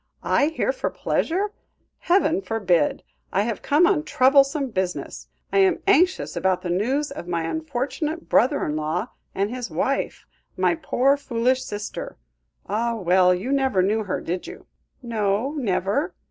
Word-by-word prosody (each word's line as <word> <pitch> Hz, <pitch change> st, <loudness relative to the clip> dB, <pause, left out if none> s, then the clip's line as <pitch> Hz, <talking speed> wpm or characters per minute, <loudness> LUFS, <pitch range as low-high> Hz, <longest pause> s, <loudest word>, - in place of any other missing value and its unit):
I 285 Hz, -, +3 dB
here 325 Hz, +10 st, 0 dB
for -, -, -3 dB
pleasure? 390 Hz, +5 st, -1 dB, 0.5 s
Heaven 345 Hz, 0 st, +2 dB
forbid. 185 Hz, -, +1 dB, 0.3 s
I 200 Hz, -, +2 dB
have 225 Hz, -1 st, -3 dB
come 300 Hz, +5 st, +4 dB
on 340 Hz, -4 st, +3 dB
troublesome 275 Hz, 0 st, +3 dB
business. 185 Hz, -3 st, -3 dB, 0.3 s
I 395 Hz, -, +4 dB
am 380 Hz, -2 st, +3 dB
anxious 375 Hz, -1 st, +3 dB
about 185 Hz, 0 st, 0 dB
the 175 Hz, -, -2 dB
news 260 Hz, +11 st, 0 dB
of 180 Hz, -, -7 dB
my 170 Hz, -2 st, -1 dB
unfortunate 300 Hz, -, -3 dB
brother 280 Hz, +5 st, +3 dB
in 150 Hz, -, -2 dB
law 155 Hz, +9 st, -2 dB, 0.3 s
and 200 Hz, +3 st, 0 dB
his 250 Hz, -1 st, -5 dB
wife, -, -, -2 dB, 0.3 s
my -, -, +3 dB
poor, 280 Hz, -4 st, +2 dB
foolish 255 Hz, -1 st, 0 dB
sister. 210 Hz, -3 st, -6 dB, 0.5 s
Ah! 230 Hz, +3 st, -1 dB
well 180 Hz, -2 st, +4 dB
you 185 Hz, +9 st, -1 dB
never 265 Hz, -9 st, +2 dB
knew 215 Hz, +3 st, +1 dB
her, 190 Hz, -, -2 dB
did 175 Hz, +2 st, -4 dB
you?" -, -, -10 dB, 0.4 s
"No, 220 Hz, +2 st, 0 dB
never." 255 Hz, -, -1 dB
245 Hz, 150 wpm, -23 LUFS, 195-295 Hz, 0.5 s, come